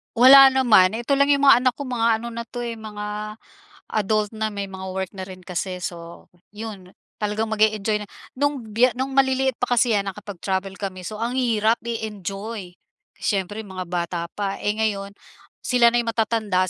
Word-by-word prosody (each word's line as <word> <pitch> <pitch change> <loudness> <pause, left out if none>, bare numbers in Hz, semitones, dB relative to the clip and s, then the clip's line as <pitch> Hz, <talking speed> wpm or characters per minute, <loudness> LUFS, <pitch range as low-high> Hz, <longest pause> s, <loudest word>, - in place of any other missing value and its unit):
Wala 265 +2 +9
naman 215 -8 +5
ito 240 +5 0
lang 280 - +5
yung 280 - +1
mga 255 - +8
anak 255 - +4
ko 280 -2 -7
mga 230 -2 +1
ano 235 - -5
na 235 0 -6
'to, 245 +1 -7
eh, 235 -1 -4
mga 210 -1 -6 0.6
adult 215 0 +1
na 215 -1 -3
may 200 -1 -4
mga 190 0 -8
work 190 -1 -3
na 190 - -5
rin 185 -1 -11
kasi, 180 0 -4
so 170 -1 -7 0.2
'yon. 205 -4 -8 0.2
Talagang 215 +1 -2
mag-e-enjoy 215 -1 +1
na - - -27 0.3
nung 285 -1 0
biye 230 +3 +2
nung 260 +3 -3
maliliit 265 -1 +2
pa 245 0 0
kasi 240 -1 +3
'yan 195 -1 -2
kapag 200 0 -9
travel 190 +2 -3
kami, 190 -2 -5
so 210 +4 -6
ang 230 +3 -2
hirap 230 -3 +1
i-enjoy. 210 -3 -5 0.4
Siyempre 205 +2 -2
mga 185 -2 -6
bata 175 0 -2
pa, 200 +1 -4
eh, 205 - 0
ngayon 200 -2 -2 0.5
sila 245 -2 +5
na'y 240 0 0
matatanda 220 -5 0
215 Hz, 180 wpm, -23 LUFS, 195-235 Hz, 0.6 s, Wala